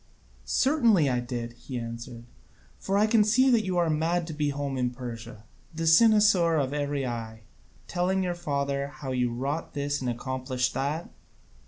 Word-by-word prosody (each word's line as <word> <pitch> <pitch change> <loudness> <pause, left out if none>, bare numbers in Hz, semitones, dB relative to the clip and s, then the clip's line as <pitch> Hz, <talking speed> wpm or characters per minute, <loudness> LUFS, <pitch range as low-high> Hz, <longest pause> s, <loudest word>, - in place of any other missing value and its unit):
"Certainly 230 - +3
I 125 - +1
did," 120 -1 -5
he 125 +1 -7
answered, 115 0 -7 0.5
"for 195 +1 -1
I 210 - +4
can 220 0 +4
see 255 +5 +4
that 230 -3 +3
you 185 -2 -2
are 170 -1 +3
mad 165 +2 0
to 160 - -6
be 150 -1 0
home 140 -1 -3
in 125 -1 0
Persia, 120 -3 -8 0.3
the 165 0 -2
cynosure 195 -1 +5
of 135 -1 -1
every 145 -2 -1
eye, 115 -2 -5 0.5
telling 185 +2 0
your 180 -1 -1
father 140 -4 -2
how 135 -1 -7
you 125 -1 0
wrought 140 +7 -3
this 145 0 -2
and 125 - -1
accomplished 130 +1 -2
that." 145 +6 -3
140 Hz, 170 wpm, -27 LUFS, 125-175 Hz, 0.5 s, cynosure